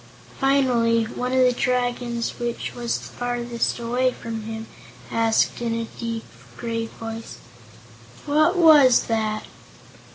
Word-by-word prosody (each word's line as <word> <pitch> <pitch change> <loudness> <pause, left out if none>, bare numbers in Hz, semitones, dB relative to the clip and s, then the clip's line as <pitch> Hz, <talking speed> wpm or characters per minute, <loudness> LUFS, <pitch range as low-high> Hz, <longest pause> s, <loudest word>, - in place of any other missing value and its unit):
Finally 250 -4 +3
one 250 +3 -4
of 260 - +1
the 255 -1 +5
Dragons 245 -1 -1
which 240 -1 -3
was 240 -1 -2
farthest 240 -1 -3
away 245 +2 +1
from 225 -3 -6
him 220 0 -5 0.5
asked, 225 +1 +2
in 230 -1 -1
a 230 0 -2
deep, 230 -1 -4 0.3
grave 230 -1 -3
voice: 225 0 -7 0.9
"What 310 +5 +3
was 300 -7 +7
that?" 215 -1 -1
235 Hz, 120 wpm, -23 LUFS, 230-250 Hz, 0.9 s, was